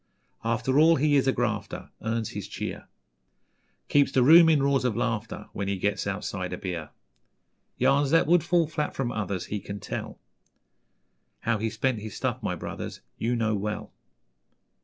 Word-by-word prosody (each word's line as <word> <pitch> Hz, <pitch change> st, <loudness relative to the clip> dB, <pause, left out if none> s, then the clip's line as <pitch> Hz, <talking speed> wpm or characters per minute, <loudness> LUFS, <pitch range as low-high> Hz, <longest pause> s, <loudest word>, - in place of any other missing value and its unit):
After 120 Hz, +4 st, +1 dB
all, 165 Hz, +2 st, +6 dB
he 145 Hz, +1 st, +2 dB
is 135 Hz, -1 st, +3 dB
a -, -, +5 dB
grafter, 110 Hz, -5 st, -3 dB
Earns 110 Hz, 0 st, -2 dB
his -, -, -6 dB
cheer -, -, -6 dB, 1.0 s
Keeps 140 Hz, -1 st, +3 dB
the 130 Hz, -2 st, +3 dB
room 165 Hz, +4 st, +8 dB
in 150 Hz, -4 st, +4 dB
roars 140 Hz, -1 st, +2 dB
of 120 Hz, -3 st, 0 dB
laughter 115 Hz, -2 st, -2 dB
When 100 Hz, -, -3 dB
he 100 Hz, 0 st, -1 dB
gets -, -, -1 dB
outside -, -, -3 dB
a -, -, -3 dB
beer. 85 Hz, -5 st, -5 dB, 0.9 s
Yarns 140 Hz, 0 st, +3 dB
that 165 Hz, +3 st, +4 dB
would 170 Hz, +2 st, +4 dB
fall 170 Hz, -1 st, +3 dB
flat 150 Hz, -1 st, -3 dB
from 125 Hz, -3 st, -1 dB
others 100 Hz, -4 st, -3 dB
He 105 Hz, -, -3 dB
can 100 Hz, +1 st, -7 dB
tell; -, -, -5 dB, 1.2 s
How 115 Hz, -2 st, 0 dB
he 110 Hz, +1 st, -1 dB
spent 130 Hz, +1 st, -1 dB
his 110 Hz, 0 st, -7 dB
'stuff', -, -, -2 dB
my -, -, -2 dB
brothers, -, -, -6 dB, 0.2 s
You 120 Hz, +2 st, 0 dB
know 110 Hz, -2 st, +1 dB
well. 105 Hz, +1 st, -3 dB
120 Hz, 170 wpm, -27 LUFS, 105-145 Hz, 1.2 s, room